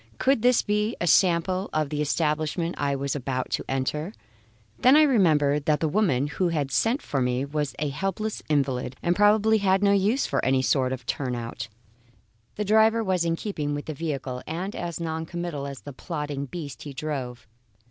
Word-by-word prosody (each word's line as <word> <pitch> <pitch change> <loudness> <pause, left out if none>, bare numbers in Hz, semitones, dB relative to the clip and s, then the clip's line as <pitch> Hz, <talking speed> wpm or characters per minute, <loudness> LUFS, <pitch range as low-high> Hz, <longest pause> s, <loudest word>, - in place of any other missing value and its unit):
Could 270 -4 +2
this 250 0 +4
be 210 +2 0
a - - -1
sample 185 +2 +3
of 155 -2 0
the 150 0 -2
establishment 155 +3 0
I 140 -1 -1
was 140 +1 -2
about 130 -2 -3
to - - -2
enter? 150 +7 -2 0.7
Then 255 +3 +6
I 310 - +7
remembered 150 - +3
that 150 -1 +2
the 160 - +1
woman 155 -7 +1
who 165 +5 -1
had 150 -5 -1
sent 230 - +1
for 135 - -1
me 125 +1 0
was 145 -2 -3
a 150 -1 -1
helpless 195 +8 -3
invalid, 135 -4 0
and 175 +1 +2
probably 215 +2 +4
had 195 0 +2
no 200 - +5
use 205 +7 +2
for - - -1
any 130 0 +2
sort 130 -1 +2
of 130 -2 -5
turnout. 120 -3 -3 0.9
The 210 - -2
driver 220 +2 +4
was 185 -4 +1
in 165 0 +1
keeping 150 -7 -3
with 145 - -5
the 155 - -4
vehicle, 135 -5 -4
and 185 +5 -4
as 170 -1 -4
noncommittal 160 -2 -4
as 140 -1 -8
the 145 - -9
plodding 145 -2 -4
beast 140 -5 -7
he 145 - -7
drove. 130 -4 -5
155 Hz, 185 wpm, -25 LUFS, 140-195 Hz, 0.9 s, I